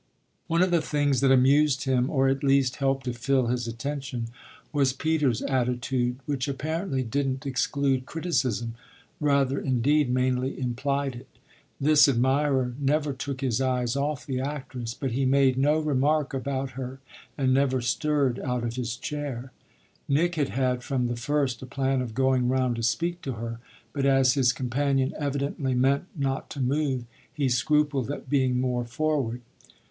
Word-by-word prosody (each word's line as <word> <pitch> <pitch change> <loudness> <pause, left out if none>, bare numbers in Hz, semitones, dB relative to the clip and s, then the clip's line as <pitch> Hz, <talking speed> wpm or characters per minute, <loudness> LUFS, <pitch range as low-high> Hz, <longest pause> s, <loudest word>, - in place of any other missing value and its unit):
One 170 +1 +3
of 185 - +1
the 170 -2 +3
things 145 -4 +1
that 135 - +4
amused 135 +1 +4
him 130 -2 +1
or 135 -2 +2
at 135 +1 0
least 135 -2 +3
helped 135 -1 0
to 125 - -2
fill 130 +2 +1
his 120 0 -1
attention 130 0 -4 0.4
was 135 -3 +2
Peter's 145 -4 0
attitude, 125 -1 0
which 140 -2 -2
apparently 150 +1 -2
didn't 135 +3 -2
exclude 135 0 0
criticism 130 - -1 0.5
rather 140 -2 +2
indeed 135 +2 +2
mainly 130 +1 0
implied 135 +2 -1
it. 120 - -10 0.5
This 150 +1 +6
admirer 130 0 +2
never 145 +1 +1
took 135 0 -5
his 130 -2 0
eyes 125 -1 0
off 145 0 -2
the 130 -2 -2
actress, 130 -4 -5
but 135 -3 -3
he 135 +4 0
made 135 0 +4
no 145 +4 +3
remark 150 -1 +1
about 135 0 -2
her 130 +1 -6 0.4
and 130 -2 +2
never 130 -1 +2
stirred 135 +1 0
out 125 -1 -2
of 120 +1 -3
his 120 -2 -2
chair. 135 -2 -5 0.6
Nick 165 +5 +2
had 150 -4 0
had 130 -2 0
from 125 0 -1
the 120 0 -1
first 135 +1 -1
a 130 - -8
plan 135 0 0
of 115 -3 -5
going 130 -1 +2
round 130 -2 +1
to - - -3
speak 170 +9 -1
to 135 - -4
her, 115 +1 -5 0.3
but 140 -1 0
as 135 -2 +4
his 130 -3 +3
companion 135 +1 0
evidently 140 -2 -1
meant 135 +6 +2
not 135 -3 -2
to - - -7
move 135 -1 0 0.3
he 145 -1 -1
scrupled 145 0 +1
at 145 - -6
being 130 -3 +2
more 125 -1 0
forward. 125 -1 -1
135 Hz, 165 wpm, -26 LUFS, 125-140 Hz, 0.6 s, This